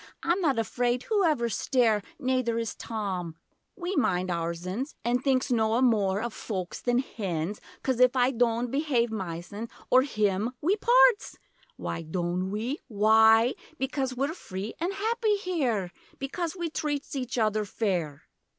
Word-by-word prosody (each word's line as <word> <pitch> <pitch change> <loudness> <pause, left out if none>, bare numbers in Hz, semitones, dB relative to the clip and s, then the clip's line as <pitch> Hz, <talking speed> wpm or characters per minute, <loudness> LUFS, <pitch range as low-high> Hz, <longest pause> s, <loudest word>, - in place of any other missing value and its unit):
I'm 350 +3 +1
not 285 -8 +2
afraid 245 +3 0
whoever 330 - +2
stare, 225 -1 +2 0.2
Nayther 255 -3 0
is 230 -1 -2
Tom! 190 -7 -4 0.4
We 370 0 -3
minds 185 - +1
oursens 175 - -3
An' 240 +1 +2
thinks 260 0 +1
noa 225 +1 +2
more 205 -4 +2
of 235 -2 -3
foaks 185 -5 -5
than 245 -1 +1
hens, 195 -7 -3 0.2
Coz 260 -3 0
if 250 +1 +5
I 250 0 +3
doant 235 -1 +1
behave 270 -5 +1
mysen 195 +2 -5 0.2
Or 255 - +7
him 215 -3 0
We 360 +7 +2
parts! 485 +1 +4 0.4
Why - - -4
doant 175 +3 -2
we? 230 +9 -3
Why? 220 +1 +5 0.2
Becoz 265 -1 -2
we're 280 +4 0
free 200 - -6
an' 345 +4 -1
happy 435 +2 +1
here, 270 - -1 0.3
Becoz 325 +5 -3
we 340 -3 -3
treats 290 -2 -3
each 255 -1 -3
other 215 -1 +2
fair!' 180 -9 -2
235 Hz, 145 wpm, -28 LUFS, 205-275 Hz, 0.4 s, Or